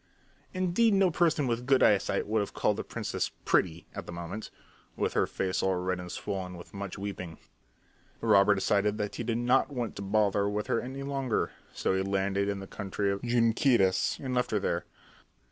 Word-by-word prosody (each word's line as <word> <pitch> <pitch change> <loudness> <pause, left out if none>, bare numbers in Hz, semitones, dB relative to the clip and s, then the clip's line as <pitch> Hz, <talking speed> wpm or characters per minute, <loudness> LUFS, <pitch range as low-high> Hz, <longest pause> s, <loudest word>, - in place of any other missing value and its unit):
Indeed 185 +4 +2
no 195 -2 +4
person 160 -3 +2
with 120 0 -2
good 135 -1 +5
eyesight 100 -2 +3
would 110 +1 +1
have 100 - -3
called - - +1
the - - -3
princess - - -3 0.2
pretty 85 -2 +1
at - - -7
that - - -6
moment, 85 +5 -6 0.5
with - - -1
her - - +2
face 95 -1 -1
all 95 -1 +2
red 90 0 -1
and 90 0 -7
swollen 90 -2 -4
with 85 - -12
much 100 -1 -5
weeping. 95 -4 -6 0.8
The - - -6
robber 105 -2 +6
decided 100 +2 +1
that 105 -1 -3
he - - -3
did 115 0 -1
not 125 +4 +3
want 125 -5 -3
to - - -5
bother 100 0 +2
with 105 +1 -2
her 115 - 0
any 135 +2 -6
longer, 135 -4 -1 0.2
so - - -1
he 95 - +1
landed 100 +1 0
in 100 -1 -2
the - - -6
country 100 0 -2
of 100 - -3
the 125 - -5
Junqueiras 115 -4 +3
and 130 -2 -4
left 125 0 +1
her 105 - +1
there. 85 -3 -1
105 Hz, 200 wpm, -29 LUFS, 95-125 Hz, 0.8 s, robber